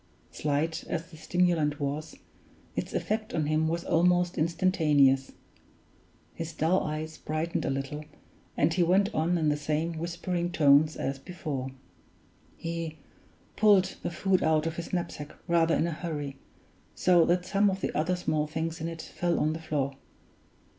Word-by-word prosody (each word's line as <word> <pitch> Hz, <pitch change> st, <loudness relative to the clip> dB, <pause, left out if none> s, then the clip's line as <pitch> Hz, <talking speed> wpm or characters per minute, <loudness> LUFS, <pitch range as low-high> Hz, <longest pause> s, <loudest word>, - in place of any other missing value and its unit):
Slight 150 Hz, +2 st, -1 dB
as 165 Hz, +1 st, -4 dB
the -, -, -11 dB
stimulant 165 Hz, -4 st, +1 dB
was, 150 Hz, +2 st, -3 dB, 0.6 s
its -, -, -3 dB
effect 215 Hz, 0 st, -2 dB
on 155 Hz, -2 st, +1 dB
him 155 Hz, +1 st, +1 dB
was 170 Hz, +1 st, -1 dB
almost 175 Hz, +1 st, +3 dB
instantaneous. 155 Hz, -6 st, +3 dB, 1.0 s
His 165 Hz, 0 st, -5 dB
dull 165 Hz, +5 st, +2 dB
eyes 155 Hz, +1 st, -4 dB
brightened 155 Hz, +2 st, -2 dB
a -, -, 0 dB
little, 140 Hz, +3 st, -3 dB, 0.5 s
and 155 Hz, +3 st, +3 dB
he 180 Hz, -, +1 dB
went 190 Hz, +4 st, +3 dB
on 170 Hz, +3 st, +1 dB
in 155 Hz, -2 st, +2 dB
the 150 Hz, -, +2 dB
same 155 Hz, +2 st, -1 dB
whispering 175 Hz, +1 st, -2 dB
tones 150 Hz, -1 st, +5 dB
as 135 Hz, 0 st, -3 dB
before: 145 Hz, -5 st, -5 dB, 0.9 s
"He 165 Hz, -1 st, -4 dB, 0.6 s
pulled 205 Hz, -4 st, +4 dB
the -, -, -2 dB
food 185 Hz, +2 st, +1 dB
out 155 Hz, -1 st, +2 dB
of 165 Hz, 0 st, -3 dB
his 170 Hz, -, -5 dB
knapsack 170 Hz, -4 st, -4 dB
rather 165 Hz, -1 st, +3 dB
in -, -, +2 dB
a 170 Hz, -, -1 dB
hurry, 150 Hz, -4 st, -4 dB, 0.6 s
so 175 Hz, -2 st, +5 dB
that 175 Hz, +1 st, +1 dB
some 200 Hz, +2 st, +3 dB
of 190 Hz, 0 st, -3 dB
the -, -, -2 dB
other 160 Hz, +4 st, +1 dB
small 155 Hz, -4 st, 0 dB
things 160 Hz, +1 st, -3 dB
in 165 Hz, -, -2 dB
it 165 Hz, -1 st, -6 dB
fell 175 Hz, -1 st, -1 dB
on 155 Hz, +1 st, +1 dB
the 160 Hz, -, -6 dB
floor. 140 Hz, -4 st, -1 dB
165 Hz, 160 wpm, -28 LUFS, 150-175 Hz, 1.0 s, tones